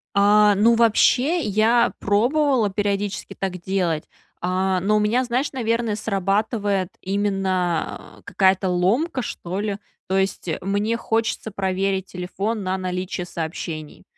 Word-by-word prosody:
А, 205 +1 +5
ну 225 +4 +4
вообще 250 +8 +3
я 225 +1 +3
пробовала 245 +3 +2
периодически 205 0 -2
так 185 -2 -3
делать, 175 -4 -1 0.4
а, 185 +1 0
но 200 +4 +1
у - - +4
меня, 220 +5 +2
знаешь, 250 +3 -1
наверно, 230 -3 -1
срабатывает 200 -1 0
именно 190 -3 -2
какая-то 190 -1 +2
ломка, 225 - +1
что 185 -4 -5
ли. 205 -1 -2 0.3
То 190 - 0
есть 190 -2 -1
мне 205 +4 0
хочется 225 -1 -1
проверить 190 0 -1
телефон 195 +4 -3
на 185 0 -1
наличие 185 -1 -3
сообщений. 160 -2 -6
200 Hz, 125 wpm, -22 LUFS, 185-225 Hz, 0.4 s, А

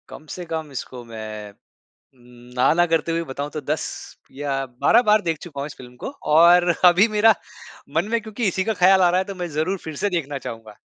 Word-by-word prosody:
कम 155 - -11
से 180 - -7
कम 160 -2 -5
इसको 125 -2 -7
मैं 110 -2 -8 0.6
ना, 125 +1 -1
ना 175 +1 +3
करते 165 0 0
हुए 165 0 -1
बताऊँ 140 -1 -5
तो 155 - -5
10 150 +3 -2 0.5
या 135 -1 -3
12 125 - +3
बार 215 0 +5
देख 165 -4 -2
चुका 145 -5 -7
हूँ - - -3
इस 150 - -11
फ़िल्म 125 -1 -13
को - - -2 0.2
और 175 +2 +6 0.2
अभी 180 +4 +6
मेरा 220 +1 +6 0.6
मन 170 +5 +1
में 235 0 +1
क्योंकि 220 0 -3
इसी 185 +1 -1
का 220 - 0
ख़्याल 190 +1 +6
आ 175 - +5
रहा 180 - +2
है 190 - 0
तो 195 - -7
मैं 180 -2 -4
ज़रूर 160 +6 -1
फिर 160 -2 -7
से 205 - 0
देखना 145 -6 -2
चाहूँगा। 115 -4 -9
160 Hz, 220 wpm, -22 LUFS, 135-180 Hz, 0.6 s, और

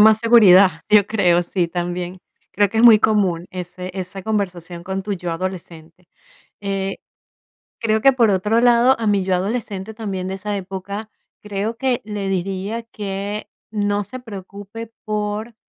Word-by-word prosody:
mas 220 0 +7
seguridad, 205 -5 +7 0.2
yo 210 -1 +6
creo, 175 -5 +3
sí, 175 0 -1
también. 175 +1 -4 0.3
Creo 205 0 +3
que 220 +3 -2
es - - +4
muy 225 -3 +9
común 190 -6 +1
ese 180 0 -7
esa 190 0 -6
conversación 180 -5 -3
con 190 +1 -4
tu 205 +1 -3
yo 175 -2 -4
adolescente. 170 -1 -7 0.5
Eh, 195 -1 -2 0.8
creo 220 -1 +1
que, 270 +1 +6
por 235 -4 +3
otro 210 +4 +2
lado, 245 +2 +5
a 225 - -1
mi 200 -2 +2
yo 185 -1 +1
adolescente, 200 +1 -3
también, 195 -4 -4
de 190 - -3
esa 205 +1 -4
época, 195 +3 -6 0.3
creo 210 +2 -3
que 255 -2 0
le 205 -2 -3
diría 195 +4 -2
que 205 -1 -5 0.2
no 205 -1 0
se 255 +6 -8
preocupe 205 0 -9
por, 210 +1 -3
200 Hz, 155 wpm, -20 LUFS, 185-220 Hz, 0.8 s, muy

